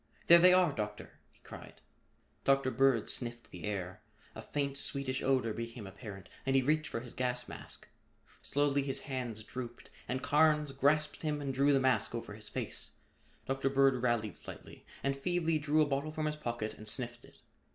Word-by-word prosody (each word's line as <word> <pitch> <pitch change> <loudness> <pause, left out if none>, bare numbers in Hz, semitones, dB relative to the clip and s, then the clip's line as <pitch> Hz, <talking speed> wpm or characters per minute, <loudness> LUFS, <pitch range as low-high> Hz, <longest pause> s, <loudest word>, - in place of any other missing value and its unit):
"There 170 0 +9
they 180 +1 +8
are, 180 -3 +5
Doctor!" 105 -4 -5
he - - -26
cried. - - -11 0.6
Dr. 135 -1 +3
Bird 130 -3 +3
sniffed 120 -1 -4
the 90 - -7
air. 95 -3 -4 0.3
A - - -7
faint 140 -1 -2
sweetish 140 -2 -1
odor 130 -4 +2
became 115 -1 -6
apparent 95 0 -9 0.2
and 135 0 +1
he 135 - +5
reached 155 +3 +2
for 115 - -4
his 120 -1 -9
gas 125 -1 -1
mask. - - -10 0.5
Slowly 145 0 +1
his 135 -1 -2
hands 125 -6 -4
drooped 120 0 -8 0.2
and 130 +1 -2
Carnes 150 0 +4
grasped 145 +3 +1
him 150 -2 -1
and 140 -2 -3
drew 140 +2 +4
the 135 - +4
mask 120 -4 +2
over 115 -3 -5
his 110 0 -5
face. - - -4 0.5
Dr. 135 0 0
Bird 135 -2 +4
rallied 115 -5 0
slightly - - -10 0.2
and 140 0 +1
feebly 165 +2 0
drew 150 +1 +3
a - - +2
bottle 145 +2 -1
from 155 0 -2
his 150 0 0
pocket 120 -6 -3
and 110 - -10
sniffed 120 +1 -4
it. - - -17
135 Hz, 185 wpm, -33 LUFS, 115-145 Hz, 0.6 s, There